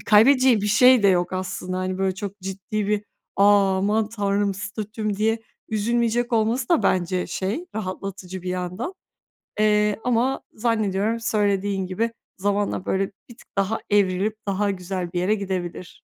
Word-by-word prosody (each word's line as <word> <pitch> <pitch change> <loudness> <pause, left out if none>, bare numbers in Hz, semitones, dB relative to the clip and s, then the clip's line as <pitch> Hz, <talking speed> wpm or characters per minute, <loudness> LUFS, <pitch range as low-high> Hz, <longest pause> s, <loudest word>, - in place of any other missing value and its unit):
kaybedeceği 245 +2 +6
bir 205 - -1
şey 250 +2 +6
de 200 - +6
yok 180 -1 +2
aslında. 185 0 -3
Hani 185 0 -2
böyle 190 -1 +1
çok 200 0 -6
ciddi 195 +2 -3
bir 210 0 0 0.3
"A, 200 -1 +5
aman 210 +2 +1
tanrım! 200 -2 0
Statüm!" 215 +1 -4
diye 220 +2 +1 0.3
üzülmeyecek 235 +2 0
olması 230 +2 +1
da 335 - +3
bence, 180 0 +1
şey, 210 - -3
rahatlatıcı 190 -2 -5
bir 185 - -5
yandan. 180 - -3 0.7
Eee, 210 -1 +3
ama 250 +2 +1
zannediyorum 220 -1 0
söylediğin 200 -3 0
gibi 225 +5 -1 0.3
zamanla 200 0 0
böyle 195 +1 +1 0.2
bir 235 - -13
tık - - -19
daha 200 +3 +1
evrilip 205 +1 +2
daha 200 +1 +1
güzel 180 -2 -4
bir 175 - -1
yere 200 +4 +2
gidebilir. 185 -3 -4
205 Hz, 150 wpm, -23 LUFS, 190-220 Hz, 0.7 s, kaybedeceği